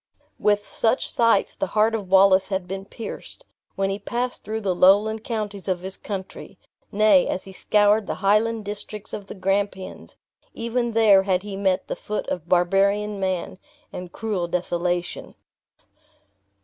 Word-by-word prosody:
With 205 0 +1
such 230 +3 0
sights 230 -1 +2
the 295 - -2
heart 220 +2 +4
of 205 -4 -3
Wallace 190 0 +5
had 190 -2 -3
been 195 +1 -5
pierced, 230 - -9 0.3
when 195 0 0
he 195 - -3
passed 245 +4 -3
through 220 +2 -4
the 195 -3 0
lowland 205 +5 +4
counties 210 -4 -4
of 185 -2 -1
his 190 +1 -6
country; 190 -2 -7 0.3
nay, 205 -3 +4
as 185 - -3
he 190 - -11
scoured 205 +2 +2
the - - -2
highland 215 +2 +1
districts 210 +1 -5
of 200 -1 -6
the - - -8
Grampians, 195 0 -3 0.4
even 235 0 -2
there 215 -4 +6
had 190 -1 0
he 205 -1 -6
met 190 -1 0
the - - -3
foot 210 - -4
of 175 -1 -4
barbarian 200 +3 +2
man, 185 -1 -2 0.3
and 180 -1 -7
cruel 205 -6 -2
desolation. 175 0 -2
200 Hz, 155 wpm, -23 LUFS, 190-215 Hz, 0.4 s, there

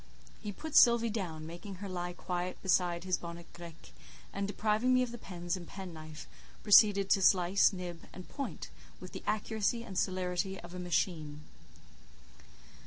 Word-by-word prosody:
He 210 - -4
put 315 +9 -7
Sylvie 235 -1 +6
down, 170 -8 -4
making 175 +4 -8
her 200 +2 -7
lie 175 -1 -4
quiet 180 +1 -4
beside 175 -2 +2
his 185 -1 0
bonnet 170 0 -8
grec, 170 -2 -11 0.4
and, 200 0 -2
depriving 215 +4 +1
me 255 - +4
of 245 - -4
the 240 - -8
pens 175 -2 -4
and 175 -2 -8
penknife, 160 -5 -9 0.4
proceeded 205 -2 +6
to 195 - +4
slice, 185 +2 +5
nib, 180 -3 -6
and 185 - -10
point 280 -2 -6 0.3
with - - -9
the - - -7
accuracy 215 +2 0
and 195 -5 -9
celerity 185 0 -1
of 175 0 -11
a 180 - -6
machine. 165 -4 -1
185 Hz, 160 wpm, -32 LUFS, 175-205 Hz, 0.4 s, Sylvie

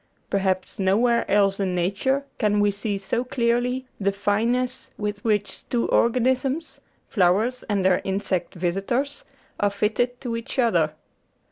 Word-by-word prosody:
Perhaps 190 -1 0
nowhere 230 +5 +2
else 200 -1 +3
in 190 -2 0
nature 205 +11 0
can 210 -2 +2
we 205 0 +3
see 200 0 -3
so 200 +5 -1
clearly 245 +1 0
the 200 -1 +1
fineness 235 +6 0
with 205 -1 -3
which 210 -3 -1
two 240 -2 +1
organisms 260 +5 +1 0.3
flowers 210 +7 +2
and 200 -3 +1
their 185 -1 +4
insect 190 -2 -2
vis 175 +1 -1
itors 265 +8 -2 0.4
are 205 - +3
fitted 220 +5 0
to 240 -3 -3
each 230 +3 -6
other. 170 -11 +2
210 Hz, 140 wpm, -24 LUFS, 195-245 Hz, 0.4 s, their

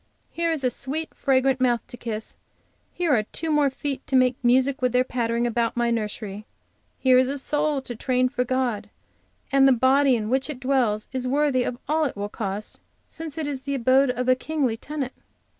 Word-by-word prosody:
Here 335 0 0
is 310 -4 -2
a 250 - +2
sweet, 300 +7 -4
fragrant 265 -1 +1
mouth 240 -2 +2
to - - -10
kiss; 220 -3 -5 0.6
here 345 -4 0
are 225 - +4
two 315 +9 -4
more 295 -2 +3
feet 275 0 -5
to 270 - 0
make 255 -1 +4
music 260 +3 +3
with 250 -1 +1
their 250 0 +4
pattering 235 -2 -1
about 235 0 0
my 235 0 +1
nursery. 210 -2 -4 0.5
Here 255 -1 +5
is 255 - +3
a 280 +2 -2
soul 295 0 0
to 240 - -7
train 255 +2 +1
for 250 -1 -1
God, 245 -5 -1 0.6
and 270 0 +5
the - - +6
body 260 +2 +4
in 215 -2 -2
which 265 +3 +1
it 285 -4 -5
dwells 255 -6 +1
is 255 -1 -2
worthy 275 -1 +1 0.2
all 315 +1 +2
it 265 - -4
will 205 0 -3
cost, 205 0 -5 0.3
since 320 -2 -8
it 315 - -2
is 280 -2 -4
the 280 +1 -3
abode 260 +2 +3
of 250 0 -2
a 255 - +6
kingly 265 -2 -1
tenant. 275 +2 -5
255 Hz, 200 wpm, -24 LUFS, 240-275 Hz, 0.6 s, the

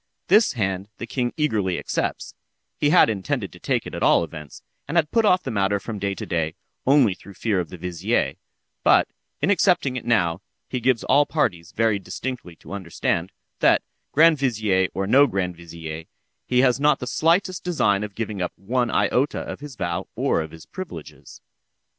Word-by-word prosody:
This 210 +5 +5
hand 100 -4 -2
the - - -5
king 120 +1 -2
eagerly 105 - 0
accepts—(he 145 - -4
had 175 - +6
intended 100 -5 -2
to - - -13
take - - -1
it - - -8
at - - -5
all - - +4
events, 75 -3 -9 0.2
and 155 +4 -1
had 155 -2 +2
put 230 -1 +3
off 185 -3 +4
the 130 - -4
matter 100 -1 +1
from 105 +1 -6
day 100 0 -2
to - - -6
day, 80 -3 -1 0.3
only 135 -7 +5
through 100 +1 -14
fear 105 -2 0
of 85 - -3
the 90 - -9
vizier),—but, 90 - 0 0.4
in 200 - +3
accepting 175 -8 +2
it - - -5
now, 95 -7 +1 0.3
he 125 - -3
gives 125 0 +1
all 145 0 +4
parties 90 - -1
very 110 -2 +1
distinctly 120 -3 -6
to 80 +3 -12
understand, 90 -1 -2 0.3
that, - - +4 0.3
grand 160 0 +5
vizier 110 -8 +1
or 95 - -1
no 135 +8 +6
grand 95 -6 -2
vizier, 80 -1 -8 0.4
he 125 0 +3
has 130 0 +3
not 150 +1 +4
the - - -6
slightest 170 +7 +1
design 105 - +1
of 105 -2 -7
giving 110 -4 -4
up 90 - -2
one 120 +4 -1
iota 135 +4 +1
of - - -6
his 145 -2 -9
vow 85 -5 -3
or - - +1
of 80 - -6
his 80 0 -13
privileges. 170 - -9
110 Hz, 185 wpm, -23 LUFS, 90-135 Hz, 0.4 s, had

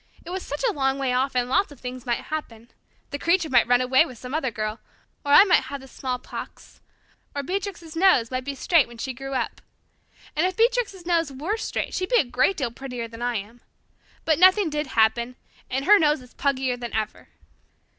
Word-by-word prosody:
It 345 - -7
was 375 +1 -3
such 290 -3 -5
a 440 - 0
long 270 -2 0
way 265 -2 0
off 260 +1 0
and 245 -1 +1
lots 390 +7 +1
of 285 - -13
things 250 0 -7
might 240 - 0
happen. 240 -7 -7 0.4
The 285 - -4
Creature 335 -2 +1
might 240 -3 +5
run 245 0 +4
away 260 +3 +4
with 255 -7 -9
some 250 +3 -8
other 300 -4 0
girl 215 0 -4 0.4
or 285 - -2
I 295 - +10
might 380 -3 +3
have 280 +1 -6
the 265 - -13
smallpox 250 -1 -7 0.5
or 285 - -2
Beatrix's 360 -1 -4
nose 325 -10 +4
might 255 0 -2
be 280 +1 -4
straight 320 +2 +3
when 235 0 -13
she 260 +3 -4
grew 270 +2 -6
up. - - -3 0.7
And 320 +4 +2
if 370 - -5
Beatrix's 455 -6 +1
nose 335 -4 +1
were 305 +11 -2
straight 450 - -3
she'd 370 0 -2
be - - +4
a - - +4
great 255 +9 +1
deal 260 -6 -1
prettier 250 -2 -6
than 230 +1 -11
I 245 0 -1
am. 220 +3 -6 0.6
But 315 -1 +2
nothing 370 -1 +5
did 300 0 -2
happen 235 +1 +1 0.3
and 265 +2 -2
her 415 +3 +7
nose 300 -2 +3
is 250 - -18
puggier 260 -3 -1
than 240 -2 -5
ever. 215 -1 -3
270 Hz, 215 wpm, -24 LUFS, 245-330 Hz, 0.7 s, I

